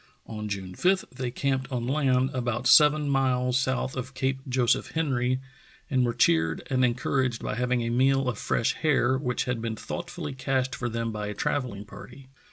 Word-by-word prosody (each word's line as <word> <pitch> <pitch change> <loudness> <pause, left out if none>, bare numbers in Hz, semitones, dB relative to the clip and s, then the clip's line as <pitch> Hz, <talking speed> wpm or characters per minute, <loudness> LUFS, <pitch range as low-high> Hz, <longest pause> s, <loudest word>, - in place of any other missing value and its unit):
On 105 -1 -6
June 95 -2 -5
5 185 - +2
they 125 -1 -4
camped 135 +1 -2
on 120 -2 -2
land, 130 -1 +2
about 120 -1 -2
seven 150 +2 +6
miles 130 -2 +2
south 130 -1 -1
of 130 +1 -6
Cape 130 +1 -1
Joseph 125 -1 +1
Henry, 130 -5 0 0.5
and 130 -2 +3
were 120 -1 +1
cheered 80 -8 +2
and 130 -1 +2
en 120 -2 +3
couraged 130 -2 -1
by - - -2
having 125 +1 0
a 115 - -2
meal 135 +2 +3
of 120 -5 -2
fresh 115 - 0
hare, 135 -4 +2
which 125 -2 -1
had 125 -3 -2
been 115 -1 -3
thoughtfully 110 - -6
cached 130 0 -1
for 120 - -3
them 115 0 -2
by 105 -1 -4
a 105 - -5
travelling 120 -5 -2
party. 135 +5 -12
125 Hz, 185 wpm, -27 LUFS, 120-135 Hz, 0.5 s, seven